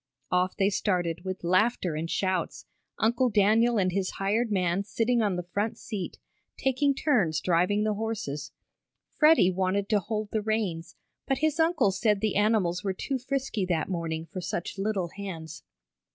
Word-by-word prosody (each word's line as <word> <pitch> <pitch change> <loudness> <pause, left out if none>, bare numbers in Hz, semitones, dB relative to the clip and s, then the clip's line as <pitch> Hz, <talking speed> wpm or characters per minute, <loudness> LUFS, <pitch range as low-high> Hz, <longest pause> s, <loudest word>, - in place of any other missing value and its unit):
Off 180 +1 +1
they 195 +1 +2
started, 175 -4 -1
with 185 -1 -5
laughter 185 0 +2
and 160 +2 -3
shouts, 185 -2 -1 0.3
Uncle 235 +4 +2
Daniel 220 +3 +3
and 185 -2 +2
his 190 0 -1
hired 215 +4 0
man 185 -1 +1
sitting 230 +3 +1
on 205 -4 +1
the 180 - -3
front 200 +5 -2
seat, 200 -6 -5 0.4
taking 270 +1 +1
turns 205 - +2
driving 180 +5 +2
the 215 0 +1
horses. 205 -9 -4 0.7
Freddie 305 - +6
wanted 190 +2 0
to 210 - +3
hold 215 +2 -4
the 220 - 0
reins, 205 -6 -2 0.3
but 270 - +1
his 310 +2 0
uncle 320 - +3
said 210 +1 +1
the 215 -1 -1
animals 205 -4 +2
were 195 -2 -1
too 265 +7 -3
frisky 260 -4 -2
that 180 -2 -1
morning 165 -3 -3
for 185 +2 -7
such 185 +1 -4
little 195 -4 -1
hands. 165 -5 -7
200 Hz, 165 wpm, -27 LUFS, 180-225 Hz, 0.7 s, Freddie